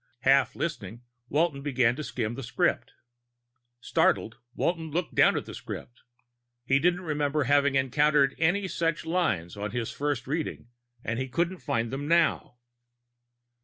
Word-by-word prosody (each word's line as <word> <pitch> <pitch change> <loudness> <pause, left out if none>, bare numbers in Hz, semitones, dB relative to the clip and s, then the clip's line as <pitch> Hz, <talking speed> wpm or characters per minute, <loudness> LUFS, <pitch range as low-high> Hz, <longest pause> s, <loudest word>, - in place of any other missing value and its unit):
Half 135 +1 +3
listening, 120 - -4 0.3
Walton 150 -1 +1
began 125 -4 +2
to 155 - -5
skim 115 -5 -3
the 135 - -6
script. 120 - -1 0.9
Startled, 110 - +1 0.2
Walton 165 -2 -1
looked 165 +3 -2
down - - +4
at - - -3
the - - -9
script. 120 - -8 0.6
He 135 +1 +3
didn't 180 +4 +2
remember 150 -2 0
having 145 +1 +3
encountered 140 +1 +3
any 185 +5 +2
such 165 -3 -1
lines 110 - -1
on 105 +1 -4
his 115 +1 -3
first 145 -4 -2
reading, 150 -4 -4 0.3
and 115 +1 -2
he 130 0 -3
couldn't 170 +6 -1
find 115 -5 -2
them 140 +2 -4
now. 165 -6 +2
140 Hz, 145 wpm, -27 LUFS, 125-160 Hz, 0.9 s, down